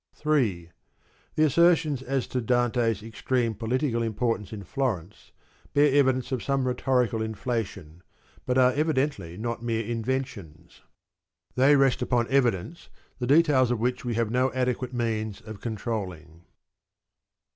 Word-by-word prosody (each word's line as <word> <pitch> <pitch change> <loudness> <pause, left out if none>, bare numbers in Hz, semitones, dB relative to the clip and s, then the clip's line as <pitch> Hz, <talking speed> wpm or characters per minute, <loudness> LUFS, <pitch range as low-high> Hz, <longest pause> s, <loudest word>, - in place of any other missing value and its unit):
3. 110 - 0 0.6
The 155 - +3
assertions 155 -2 +3
as 135 0 -1
to 125 - -3
Dante's 120 -2 +1
extreme 115 +2 -1
political 115 +3 -1
im 115 -2 -2
portance 115 -3 -1
in 105 -3 -7
Florence 105 - -4 0.4
bear 145 -1 +4
evidence 130 -2 +2
of 130 -3 -1
some 135 -2 0
rhetorical 125 -2 +1
inflation, 110 -7 -4 0.5
but 125 0 +1
are 130 0 +5
evidently 140 - -1
not 115 +2 -4
mere 115 -1 -1
inventions. 115 - -4 0.7
They 135 +3 +5
vi. 140 - +4
rest 135 -2 +1
upon 120 -2 +1
evidence, 130 - 0 0.3
the 125 - -2
details 140 -3 +4
of 120 -2 0
which 125 +2 -1
we 120 -2 -2
have 115 -1 0
no 125 +2 +2
adequate 125 -1 -1
means 110 -4 -2
of 110 -2 -10
controlling. 95 -8 -5
120 Hz, 135 wpm, -26 LUFS, 110-130 Hz, 0.7 s, are